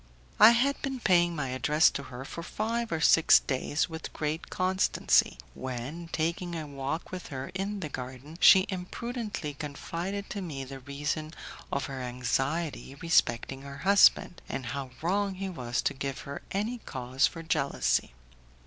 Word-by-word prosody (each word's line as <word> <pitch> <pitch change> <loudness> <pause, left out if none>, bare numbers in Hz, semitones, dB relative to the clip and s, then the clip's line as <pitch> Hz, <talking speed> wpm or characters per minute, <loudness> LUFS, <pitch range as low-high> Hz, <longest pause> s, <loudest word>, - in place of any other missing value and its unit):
I 215 - +11
had 275 +4 +1
been 270 -2 -3
paying 175 -5 +3
my 140 -4 -2
address 150 +5 +3
to - - -4
her 130 +1 -7
for 170 - -7
five 230 +6 -2
or 160 -1 -1
six 165 +1 +7
days 140 +2 -1
with 160 -2 -7
great 155 +2 -3
constancy, 185 +1 +2 0.2
when, 130 +7 -5
taking 170 +2 -2
a 160 -2 -4
walk 140 +3 -4
with 185 -1 -6
her 135 -2 -5
in 195 +1 -3
the 155 - -3
garden, 130 +3 -8
she 190 0 +8
imprudently 205 - -4
confided 170 +7 -5
to 200 - -3
me 145 -7 -5
the 135 0 -8
reason 150 +4 -4 0.4
of 140 - -1
her 135 -2 -5
anxiety 135 +5 -2
respecting 135 -4 +1
her 140 0 -9
husband, 195 -3 +5
and 135 -2 -4
how 140 -2 -4
wrong 195 +3 +1
he 195 +1 -4
was 125 -9 -2
to - - +1
give 135 0 -4
her 140 0 -7
any 220 +5 -2
cause 130 - 0
for 165 - -8
jealousy. 140 - +1
160 Hz, 160 wpm, -29 LUFS, 135-185 Hz, 0.4 s, I